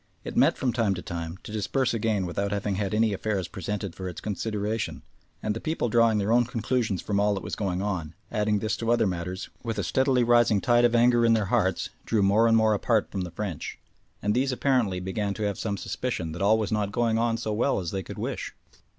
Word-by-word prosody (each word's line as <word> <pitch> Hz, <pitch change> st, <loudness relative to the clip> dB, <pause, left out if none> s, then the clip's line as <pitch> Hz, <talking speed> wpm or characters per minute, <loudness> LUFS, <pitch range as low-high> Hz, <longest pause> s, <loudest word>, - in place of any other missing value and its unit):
It -, -, -6 dB
met -, -, +4 dB
from 125 Hz, -3 st, 0 dB
time 110 Hz, -5 st, +1 dB
to 90 Hz, -, -6 dB
time, 85 Hz, 0 st, -5 dB
to -, -, -9 dB
disperse 120 Hz, +5 st, 0 dB
again 110 Hz, -4 st, 0 dB
without 100 Hz, +3 st, -2 dB
having 100 Hz, 0 st, -1 dB
had 100 Hz, 0 st, -2 dB
any 110 Hz, -1 st, +3 dB
affairs 100 Hz, -2 st, -2 dB
presented 100 Hz, 0 st, -4 dB
for 95 Hz, -1 st, -5 dB
its 90 Hz, -, -7 dB
consideration, 105 Hz, +1 st, -3 dB, 0.4 s
and 105 Hz, 0 st, -1 dB
the 115 Hz, -, -5 dB
people 160 Hz, -6 st, -1 dB
drawing 115 Hz, -1 st, +4 dB
their 105 Hz, +1 st, 0 dB
own 120 Hz, +1 st, +4 dB
conclusions 115 Hz, -4 st, -1 dB
from 100 Hz, -1 st, 0 dB
all 105 Hz, 0 st, +2 dB
that 95 Hz, -, -5 dB
was -, -, -4 dB
going 95 Hz, -2 st, -2 dB
on, 85 Hz, -6 st, -3 dB, 0.2 s
adding 105 Hz, -1 st, +1 dB
this 110 Hz, +1 st, -1 dB
to 115 Hz, -, -3 dB
other 120 Hz, -, +3 dB
matters, 90 Hz, 0 st, -3 dB
with 115 Hz, -2 st, -4 dB
a 100 Hz, -, 0 dB
steadily 130 Hz, -, +2 dB
rising 120 Hz, -3 st, +4 dB
tide 120 Hz, +2 st, +4 dB
of 120 Hz, 0 st, +3 dB
anger 120 Hz, 0 st, +5 dB
in 115 Hz, 0 st, +5 dB
their 110 Hz, -2 st, +2 dB
hearts, 95 Hz, -7 st, +1 dB
drew 110 Hz, -3 st, +1 dB
more 105 Hz, +4 st, +4 dB
and 115 Hz, 0 st, +5 dB
more 110 Hz, -1 st, +4 dB
apart 110 Hz, +1 st, +1 dB
from 95 Hz, -, -2 dB
the 90 Hz, -, -4 dB
French, 90 Hz, -2 st, -5 dB, 0.5 s
and 105 Hz, -, +2 dB
these 130 Hz, +3 st, +1 dB
apparently 125 Hz, -8 st, +1 dB
began 100 Hz, +2 st, -2 dB
to 110 Hz, -, -4 dB
have 100 Hz, -2 st, -1 dB
some 100 Hz, -2 st, -2 dB
suspicion 95 Hz, -7 st, -3 dB
that 85 Hz, +4 st, -6 dB
all 105 Hz, +3 st, +4 dB
was 110 Hz, -2 st, -2 dB
not 105 Hz, -2 st, 0 dB
going 115 Hz, -1 st, +1 dB
on 115 Hz, 0 st, +1 dB
so 110 Hz, -2 st, -3 dB
well 120 Hz, +4 st, +1 dB
as 85 Hz, -3 st, -4 dB
they 95 Hz, -, -2 dB
could -, -, -9 dB
wish. -, -, -4 dB
105 Hz, 235 wpm, -26 LUFS, 95-115 Hz, 0.5 s, anger